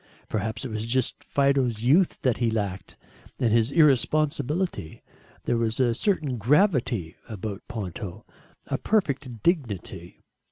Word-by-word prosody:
Perhaps 110 +4 -3
it - - -4
was 110 +1 -3
just 130 +1 0
Fido's 135 -5 +1
youth 160 +9 +3
that 125 -3 +2
he 120 -1 +1
lacked, 100 -4 -3 0.4
and 115 -3 +2
his 115 0 +3
irresponsibility. 150 - +1 0.4
There 120 - 0
was 115 0 -1
a 120 -3 +3
certain 150 - 0
gravity 125 - +2
about 105 -2 -5
Ponto 100 -4 -6 0.4
a - - -2
perfect 140 - -1
dignity. 100 - -2
120 Hz, 125 wpm, -26 LUFS, 110-140 Hz, 0.4 s, youth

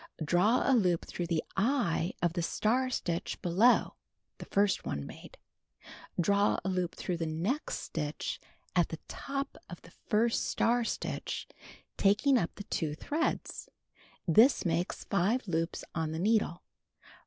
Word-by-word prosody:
Draw 185 +10 +3
a 270 - +5
loop 180 -8 +2
tlirough 175 - -4
the 165 -2 0
"eye" 200 -5 +1
of 170 -1 +2
the 175 - -1
star 245 +9 +1
stitch 175 -9 -2
below 195 +8 +4 0.4
(the - - -8
first 200 -1 +2
one 70 0 -3
made). - - -11 0.8
Draw 200 +3 +3
a - - 0
loop 180 -2 -1
through 180 -2 -3
the 165 -1 -2
next 180 - -1
stitch 150 -2 -4 0.4
at 175 -2 +3
the 165 - -5
top 275 0 -4
of - - -8
the - - -15
first 230 +1 0
star 240 +1 +2
stitch, - - -3 0.5
taking 210 +8 +4
up 175 - -3
the 205 - -7
2 155 -6 -2
threads. 310 - -2 0.6
This 220 - +5
makes 170 +2 -1
5 205 +6 +1
loops 165 -1 -1
on 160 -1 -2
the 160 - -3
needle. 205 -3 +1
190 Hz, 145 wpm, -31 LUFS, 170-230 Hz, 0.8 s, a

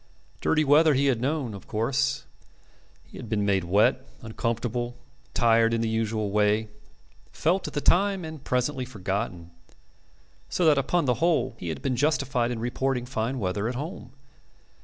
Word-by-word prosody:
Dirty 155 -1 +2
weather 150 +1 +5
he 140 +2 +2
had 125 -4 +1
known, 135 -4 -1
of 100 - -10
course. 135 +5 0 0.8
He - - -14
had 115 - -8
been 105 -2 0
made 95 -2 +2
wet, 105 +8 +3 0.2
uncomfortable, 120 +1 -2 0.4
tired 115 -1 +4
in 115 - -1
the 115 - 0
usual 110 -2 -1
way, 105 +1 +2 0.6
felt 180 +4 0
at - - -8
the 145 - 0
time 195 +1 +2
and 155 -3 -8
presently 125 +2 0
forgotten. 95 -6 -4 1.0
So 180 - 0
that 150 -3 +5
upon 165 +4 +1
the 125 - +3
whole 170 -7 +2
he 85 - -5
had 80 - -5
been 130 -2 0
justified 130 -3 +1
in 120 - -3
reporting 125 +2 -1
fine 125 +1 -2
weather 100 0 -1
at 125 - -4
home. 150 -1 -6
120 Hz, 160 wpm, -26 LUFS, 110-140 Hz, 1.0 s, weather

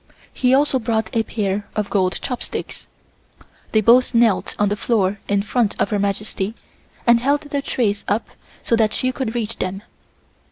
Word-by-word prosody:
He 255 0 +3
also 280 -1 +3
brought 225 -1 -1
a 225 - +4
pair 205 -2 -2
of 210 -1 -2
gold 185 -2 +1
chopsticks. 250 -2 -5 0.8
They 220 - +3
both 240 +3 +4
knelt 230 -4 +3
on 205 -1 +2
the 205 - 0
floor 205 -3 0
in 200 0 +1
front 215 0 0
of 200 - +1
Her 205 - +1
Majesty 200 +1 -2 0.5
and 235 -1 +6
held 280 +4 +1
the 290 -1 -3
trays 210 -7 -1
up 210 +3 0 0.4
so 230 - +2
that 215 -1 +2
she 255 - 0
could 250 -3 -4
reach 230 -1 -2
them. 195 +2 -3
220 Hz, 170 wpm, -21 LUFS, 205-245 Hz, 0.8 s, and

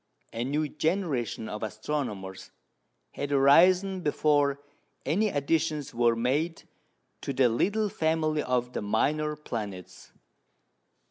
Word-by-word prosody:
A 115 - -2
new 150 +4 -1
generation 150 - -2
of 105 0 -6
astronomers 110 -4 -4 0.6
had 145 0 -5
arisen 180 +7 +5
before 145 -2 +2 0.5
any 190 +10 +2
additions 150 -1 -1
were 120 0 +3
made 145 +8 -1 0.6
to - - -3
the 130 -1 +4
little 205 - +1
family 160 -4 0
of 125 -2 -1
the - - -3
minor 150 +8 0
planets. 105 - -7
145 Hz, 110 wpm, -28 LUFS, 120-160 Hz, 0.6 s, arisen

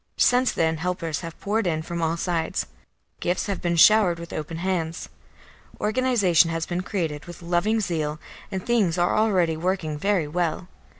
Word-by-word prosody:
Since 250 +1 +4
then 160 0 +1
helpers 165 -2 -2
have 165 -2 -8
poured 210 0 0
in 160 -2 -1
from 170 +1 -4
all 165 +1 0
sides; 170 -2 -1 0.5
gifts 175 +1 -1
have 200 -3 -3
been 170 -1 0
showered 185 0 +6
with 170 0 -9
open 155 +2 -5
hands; 170 -2 -2 0.7
organisation 210 -7 +3
has 165 0 -2
been 175 0 -2
created 165 -6 -3
with 175 0 -11
loving 175 +6 +1
zeal, 155 -6 -2 0.3
and 190 -2 -4
things 215 -9 +2
are 175 0 +2
already 185 -7 +2
working 160 -3 -2
very 195 -4 +1
well. 170 +2 -2
175 Hz, 165 wpm, -24 LUFS, 165-195 Hz, 0.7 s, showered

